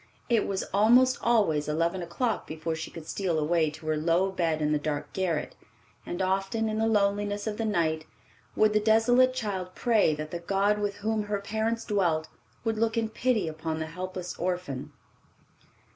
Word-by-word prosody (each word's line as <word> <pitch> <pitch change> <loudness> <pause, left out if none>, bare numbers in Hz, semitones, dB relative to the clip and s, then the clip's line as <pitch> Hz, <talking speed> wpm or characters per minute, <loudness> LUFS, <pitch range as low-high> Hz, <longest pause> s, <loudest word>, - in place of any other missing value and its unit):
It 230 -3 +2
was 195 -1 -1
almost 240 +5 +5
always 200 -11 +2
eleven 165 +4 0
o'clock 210 +7 -2
before 160 +1 -3
she 160 0 -5
could 165 -2 -10
steal 185 -5 -1
away 160 +1 +2
to 155 +2 -12
her 155 0 +1
low 170 +5 +2
bed 165 -4 0
in 150 -1 +1
the 150 - +2
dark 145 -1 -3
garret, 180 -5 -1 0.5
and 175 +2 -2
often, 195 +4 0
in 215 0 -1
the 225 - +2
loneliness 205 -1 +1
of 215 -1 -3
the 225 - -1
night, 160 -6 0 0.5
would 215 0 +4
the 215 - +4
desolate 245 +4 +4
child 190 -6 -3
pray 220 -10 +3
that 155 +1 -6
the 170 - -3
God 200 +4 +1
with 205 -1 -1
whom 215 +1 -1
her 205 -1 -1
parents 220 +3 -2
dwelt 170 -7 +1 0.3
would 225 -1 -1
look 225 +1 +1
in 225 -1 0
pity 220 -4 0
upon 160 0 -3
the 160 - -2
helpless 180 +2 -6
orphan. 180 -7 -3
195 Hz, 180 wpm, -28 LUFS, 165-220 Hz, 0.5 s, almost